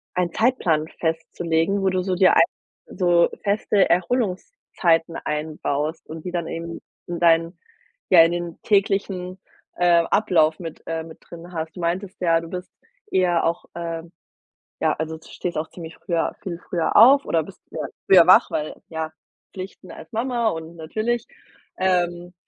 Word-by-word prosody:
einen 175 -2 0
Zeitplan 175 -10 +1
festzulegen, 165 +3 0
wo 195 - +2
du 185 -1 0
so 185 0 -1
dir 185 +1 +5
ei - - +8 0.5
so 175 -2 +3
feste 205 -1 +2
Erholungszeiten 180 - 0
einbaust 150 0 -2
und 160 +1 -8
die 180 - -3
dann 170 -2 -2
eben 165 0 -6 0.3
in 175 -1 -4
dein 165 +1 +3 0.5
ja, 175 -3 +8
in 165 - +2
den 175 -1 -5
täglichen, 195 -2 0 0.4
äh, 175 -1 +4
Ablauf 160 -7 +3
mit 165 -3 -8
äh, 165 0 -2
mit 160 0 -12
drin 170 +1 -12
hast. 160 -1 -5
Du - - -9
meintest 185 +4 -2
ja, 165 -2 +3
du 165 - -9
bist 180 +1 -7 0.4
eher 175 - +2
auch 170 +1 -1
ähm, 165 -1 -5 0.7
ja, - - +2
also, 160 +1 -3
du 160 - -18
stehst 180 - -5
auch 155 - -3
ziemlich 165 -2 -10
früher 170 -3 -1
viel 175 -3 -5
früher 170 -1 -1
auf 270 +6 +8
oder 165 - +1
bist 195 - -14
früher - - -5 0.2
früher 180 -3 +7
wach, 185 - +6
weil, 150 0 -3
ja, 160 -1 -4 0.4
Pflichten 190 0 -9
als - - -12
Mama, 235 0 0
und 160 -1 -7
natürlich, 215 +9 -2 0.5
ähm, 175 -1 0
175 Hz, 160 wpm, -23 LUFS, 165-185 Hz, 0.7 s, ei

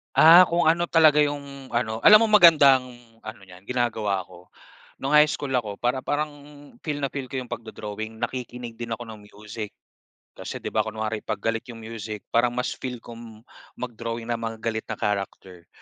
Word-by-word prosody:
Ah, 170 +3 +9
kung 170 +1 0
ano 175 +1 +1
talaga 155 -3 +5
'yong, 140 -3 -2
ano 110 -2 -1
alam 215 - +8
mo 225 - +1
magandang 145 -10 +6 0.3
ano 110 -2 -10
'yan, 95 0 -16
ginagawa 110 -6 -1
ko, 90 0 -17 0.6
no'ng 135 - -2
high 150 0 +7
school 145 -2 -4
ako 115 -6 -1
para 125 +4 -2
parang 150 +1 -1 0.6
feel 145 -1 -3
na 135 - -1
feel 135 -2 -5
ko 130 - -12
'yong 125 - -14
pagdo-drawing, 110 0 -7
nakikinig 125 -2 -5
din 115 -1 -4
ako 120 - -9
ng 110 - -10
music. 105 +1 -9 0.6
Kasi, - - -8
'di - - -4
ba, - - 0
kunwari 110 0 -3
'pag - - -4
galit 115 +1 -2
'yong 115 -2 -10
music 110 -2 -7
parang 120 +1 +2
mas 125 - -2
feel 125 -3 -7
kong 115 -1 -12 0.3
mag-drawing 115 -1 -5
ng 115 - -1
mga 115 -1 -5
galit 110 -1 -2
na 110 - -4
character. 95 -4 -4
120 Hz, 180 wpm, -24 LUFS, 110-140 Hz, 0.6 s, Ah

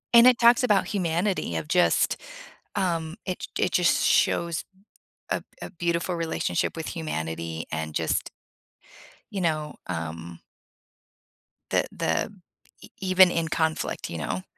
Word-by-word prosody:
And 235 - +9
it 250 -1 +5
talks 240 +1 +6
about 210 -5 +3
humanity 180 0 0
of 150 - -4
just 180 +3 +3 0.6
um, 170 -4 -1
it 185 -2 -3
j - - +1
it 180 - -2
just 175 -1 +3
shows 170 -2 +2 0.7
a - - -1 0.2
a - - -5
beautiful 170 0 -1
relationship 165 - -1
with 160 - -4
humanity 80 - -4
and 80 0 -4
just - - 0 1.0
you 195 - -2
know, 155 -3 -1
um 85 0 -5 1.3
the - - +3
the - - -1 0.5
e - - -13
even 185 -1 +6
in 165 -1 0
conflict, 160 -1 -1
you 85 - -5
know? 90 +4 -3
165 Hz, 130 wpm, -26 LUFS, -, 1.3 s, And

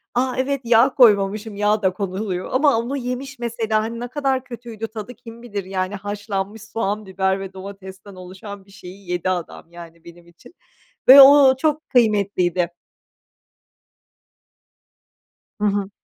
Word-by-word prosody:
A, 255 +1 0
evet, 270 +1 -1
yağ 235 +2 +4
koymamışım, 210 -2 +3
yağ 210 +1 +1
da 190 -2 +1
konuluyor 190 -1 -4
ama 275 -2 +3
onu 260 +4 -3
yemiş, 250 +1 -6
mesela, 225 -2 -1
hani, 230 +1 -5
ne 245 - -5
kadar 265 -1 -1
kötüydü 230 -3 -8
tadı 220 +2 -9
kim 230 -2 -13
bilir, 205 -5 -5
yani, 190 +1 -3
haşlanmış 205 +1 -5
soğan, 215 -1 -3
biber 190 0 -1
ve 195 -1 -8
domatesten 190 0 -11
oluşan 190 +2 -10
bir 195 - -21
şeyi 185 0 -13
yedi 180 +1 -1
adam, 175 -1 -5
yani, 170 -1 -13
benim 170 0 -15
için 170 - -19 0.6
ve 275 +2 +11
o 275 0 +8
o 260 - +3
çok 305 +2 -1
kıymetliydi. 200 - +1 2.9
Hı - - +1
hı. 200 -1 -1
210 Hz, 145 wpm, -21 LUFS, 190-240 Hz, 2.9 s, ve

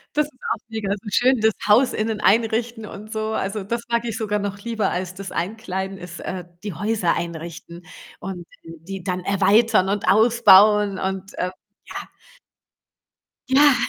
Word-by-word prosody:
Das 300 - +3
ist 265 -3 -24
auch - - -5
mega 220 -3 -3
so 210 +1 -7
schön, 250 +3 +3
das 220 -1 +4
Haus 235 +5 +5
innen 215 0 -2
einrichten 225 +2 +1
und 215 +1 -10
so. 220 0 -2
Also, 200 0 -2
das 230 +4 -3
mag 235 0 0
ich 225 -2 -3
sogar 210 -2 -1
noch 200 0 -4
lieber 220 -2 -1
als 185 0 -3
das 195 0 -8
Einkleiden 190 0 -3
ist 180 -1 -9
äh, 185 -2 -5 0.2
die 205 -3 -4
Häuser 205 0 0
einrichten 170 0 -7 0.3
und 180 -2 -6 0.2
dann 165 0 -10
die 195 -1 -6
dann 185 -1 -2
erweitern 200 +1 +3
und 200 -1 -1
ausbauen 210 -2 +6
und, 190 0 -4
ähm, 180 - -1 0.4
ja. - - -6 1.4
Ja, 285 +2 +6
205 Hz, 165 wpm, -22 LUFS, 190-225 Hz, 1.4 s, ausbauen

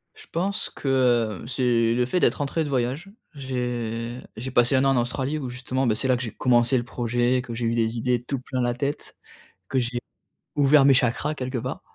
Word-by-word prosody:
Je - - -14
pense 190 +4 -1
que, 120 - +1
heu, - - -9
c'est 120 -3 +2
le 125 0 +1
fait 180 +8 0
d'être - - +3
rentré 150 +2 -1
de 145 - -4
voyage. 135 +8 -1 0.3
J'ai 120 -3 -3 0.2
j'ai 125 +4 -5
passé 120 +2 +3
1 130 - +3
an - - +4
en - - +4
Australie 130 +5 -2
où 130 -4 -4
justement, 130 +1 -1
ben, 110 - +2
c'est 130 - -1
là 125 -1 +3
que 125 - -4
j'ai 115 - -4
commencé 125 +1 +3
le 120 - 0
projet, 120 +1 0
que 120 -2 -7
j'ai 115 0 -3
eu 115 +1 +1
des 115 0 0
idées 120 0 0
tout 135 0 -3
plein 130 -1 -3
la 120 0 +1
tête, 140 +4 -4 0.5
que 130 - 0
j'ai 120 0 -1 0.6
ouvert 140 -1 +5
mes 140 - +7
chakras 130 +4 +1
quelque 130 -1 -3
part, 130 +3 -4
125 Hz, 220 wpm, -24 LUFS, 120-135 Hz, 0.6 s, mes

